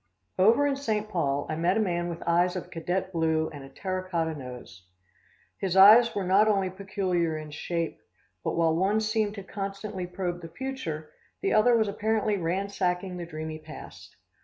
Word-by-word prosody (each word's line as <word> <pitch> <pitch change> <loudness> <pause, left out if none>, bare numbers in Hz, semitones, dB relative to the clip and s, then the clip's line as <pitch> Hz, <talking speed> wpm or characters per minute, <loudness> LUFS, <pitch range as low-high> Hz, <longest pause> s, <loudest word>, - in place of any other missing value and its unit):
Over 230 +9 +5
in 280 -1 +1
St. 220 -6 -1
Paul 145 -8 -1
I 155 - -2
met 175 +5 +1
a - - +2
man 175 -4 0
with 170 -1 -6
eyes 175 +2 +2
of 185 - -6
cadet 180 +3 -2
blue 160 -1 +1
and 145 -2 -8
a 135 - -11
terra 185 +5 -4
cotta 165 -3 0
nose. 125 -10 -10 0.7
His 190 -1 -1
eyes 220 +5 +8
were 200 - 0
not 195 +4 +4
only 195 -3 +2
peculiar 185 -4 -1
in 155 -1 -8
shape, 165 +2 -3 0.4
but - - -1
while 165 -1 +3
one 195 +5 +2
seemed 215 -1 0
to 200 - -7
constantly 195 -1 -5
probe 180 -1 -4
the 165 - -8
future, 165 -11 -5 0.3
the 395 - +1
other 235 +2 +5
was 220 -1 +2
apparently 215 +1 0
ransacking 180 0 -1
the 170 -1 -6
dreamy 155 -1 -6
past. 155 0 -11
185 Hz, 180 wpm, -27 LUFS, 165-205 Hz, 0.7 s, eyes